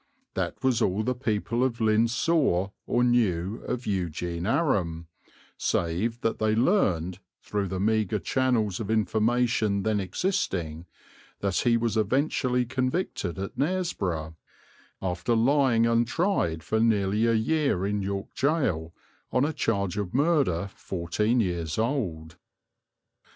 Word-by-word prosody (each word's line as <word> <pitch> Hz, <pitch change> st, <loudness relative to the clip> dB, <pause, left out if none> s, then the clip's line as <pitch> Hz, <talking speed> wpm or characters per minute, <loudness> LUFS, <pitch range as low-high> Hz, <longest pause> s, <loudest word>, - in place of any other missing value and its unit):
That -, -, -3 dB
was 125 Hz, -3 st, +2 dB
all 100 Hz, +1 st, +1 dB
the 125 Hz, +3 st, 0 dB
people 120 Hz, 0 st, -1 dB
of 125 Hz, -3 st, -1 dB
Lynn 110 Hz, +1 st, +3 dB
saw 120 Hz, -, +1 dB, 0.2 s
or 120 Hz, -, +2 dB
knew 110 Hz, -5 st, +1 dB
of 125 Hz, 0 st, -3 dB
Eugene 85 Hz, -2 st, -2 dB
Aram, 95 Hz, -, 0 dB, 0.5 s
save 100 Hz, +8 st, -1 dB
that 115 Hz, -, -1 dB
they 110 Hz, 0 st, +2 dB
learned, 95 Hz, -, +1 dB, 0.2 s
through 100 Hz, -1 st, -2 dB
the 95 Hz, 0 st, -3 dB
meagre 110 Hz, 0 st, +1 dB
channels 115 Hz, -4 st, 0 dB
of 110 Hz, -2 st, -4 dB
information 110 Hz, -1 st, +1 dB
then 110 Hz, 0 st, +1 dB
existing, 90 Hz, -, -2 dB, 0.5 s
that 100 Hz, -2 st, 0 dB
he 120 Hz, -1 st, +3 dB
was 115 Hz, -2 st, -1 dB
eventually 125 Hz, +2 st, +1 dB
convicted 130 Hz, -, -2 dB
at 95 Hz, +1 st, -5 dB
Knaresborough, 105 Hz, -, -1 dB, 0.7 s
after 90 Hz, +5 st, 0 dB
lying 125 Hz, -1 st, +3 dB
untried 115 Hz, -, +1 dB
for 110 Hz, +6 st, 0 dB
nearly 110 Hz, -1 st, +2 dB
a 115 Hz, -, +3 dB
year 115 Hz, -, +1 dB
in 105 Hz, 0 st, -1 dB
York 100 Hz, +1 st, -3 dB
gaol, 105 Hz, -, 0 dB, 0.4 s
on 130 Hz, +2 st, +2 dB
a 155 Hz, -, -1 dB
charge 100 Hz, -, -1 dB
of 100 Hz, 0 st, -4 dB
murder 135 Hz, -, +2 dB
fourteen 100 Hz, +7 st, -1 dB
years 85 Hz, -6 st, -1 dB
old. 90 Hz, -, -2 dB
110 Hz, 130 wpm, -27 LUFS, 95-125 Hz, 0.7 s, Lynn